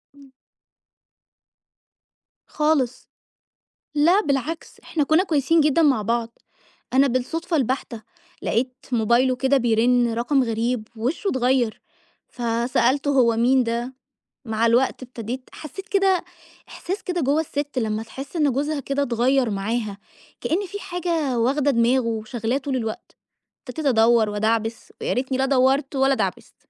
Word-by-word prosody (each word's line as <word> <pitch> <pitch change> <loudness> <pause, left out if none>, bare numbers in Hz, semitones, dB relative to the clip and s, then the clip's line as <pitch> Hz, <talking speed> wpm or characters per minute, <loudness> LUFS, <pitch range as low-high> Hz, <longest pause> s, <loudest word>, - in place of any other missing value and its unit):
إمم. 275 -2 -18 2.2
خالص. 300 -5 0 0.9
لا 345 +8 +4
بالعكس، 290 - -3
إحنا 305 -3 -1
كنا 315 +6 +3
كويسين 315 -1 +2
جدًا 305 +2 +3
مع 275 -8 +3
بعض، 230 +1 -2 0.5
أنا 275 +1 +5
بالصدفة 320 +7 -1
البحتة 255 -3 -2 0.4
لقيت 250 +2 0 0.2
موبايله 240 +3 +3
كده 265 +2 +2
بيرن 240 0 +2
رقم 255 +3 +1
غريب، 230 0 -1
وشه 260 - -2
اتغيّر، 250 -3 +1 0.5
فسألته 245 +4 0
"هو 235 -2 +4
مين 255 +2 +4
ده؟" 235 +2 -3 0.5
مع 220 +1 0
الوقت 245 +3 +2
ابتديت 250 +1 -7
حسّيت 375 +6 -9
كده 390 -2 +2 0.5
إحساس 380 +4 -5
كده 355 -3 -2
جوّا 290 +4 +2
السِت 290 -3 -4
لمّا 220 -1 -2
تحس 270 +7 -9
إن 295 -4 +2
جوزها 290 +3 -1
كده 275 +1 -1
اتغيّر 250 0 +1
معاها، 205 +1 -2 0.4
كإن 390 +5 0
في 405 +2 -7
حاجة 335 -9 -2
واخدة 280 +4 +2
دماغه 240 +1 +2
وشاغلاه 225 +2 -2
طُول 275 -1 -3
الوقت، 225 -3 -5 0.5
ابتديت 295 +4 -5
أدوّر 225 -2 +4
وأدعبس، 220 +2 -1
ويا - - 0
ريتني 260 +1 -1
لا 265 - +2
دوّرت 270 +1 +2
ولا 270 0 +3
دعبست، - - -3
260 Hz, 130 wpm, -23 LUFS, 235-285 Hz, 2.2 s, أنا